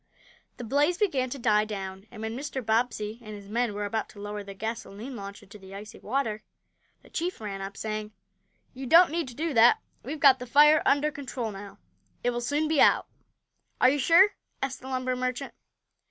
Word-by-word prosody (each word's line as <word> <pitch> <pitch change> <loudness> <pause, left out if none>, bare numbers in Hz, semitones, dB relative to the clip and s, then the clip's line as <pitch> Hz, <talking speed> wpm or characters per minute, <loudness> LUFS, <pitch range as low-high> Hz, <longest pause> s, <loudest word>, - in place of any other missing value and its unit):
The 245 - -7
blaze 290 +8 +2
began 285 -12 +1
to 275 - -5
die 210 -4 +3
down, 195 -1 -6
and 215 - -9
when 220 +1 -3
Mr. 270 -2 -5
Bobbsey 220 -1 0
and 215 -2 -8
his 200 -1 -11
men 230 0 -1
were 205 0 -2
about 220 +2 -2
to 205 - -14
lower 205 0 -5
the 200 0 -9
gasoline 225 +3 -6
launch 200 0 -8
into 205 +1 -14
the 190 0 -11
icy 215 +3 -10
water 220 -3 -2 0.6
the - - -18
chief 355 +2 -3
ran 200 -3 -5
up, 195 +1 -7
saying: 215 -1 -4 0.6
"You 265 0 -7
don't 335 +4 +7
need 330 -3 -1
to 245 - -10
do 320 +2 -2
that! 235 0 +6 0.2
We've 295 +4 -6
got 270 -2 +6
the 250 - -7
fire 300 +5 +6
under 290 +2 +3
control 255 -5 -5
now. 200 0 -10 0.5
It 245 - +2
will 240 0 -3
soon 290 +5 0
be 310 -2 +3
out." - - +5 0.7
"Are 255 - +6
you 290 - 0
sure?" 340 +9 +6 0.3
asked 270 -1 -3
the 260 - -10
lumber 255 -1 -1
merchant. 255 +2 -3
240 Hz, 200 wpm, -27 LUFS, 210-275 Hz, 0.7 s, don't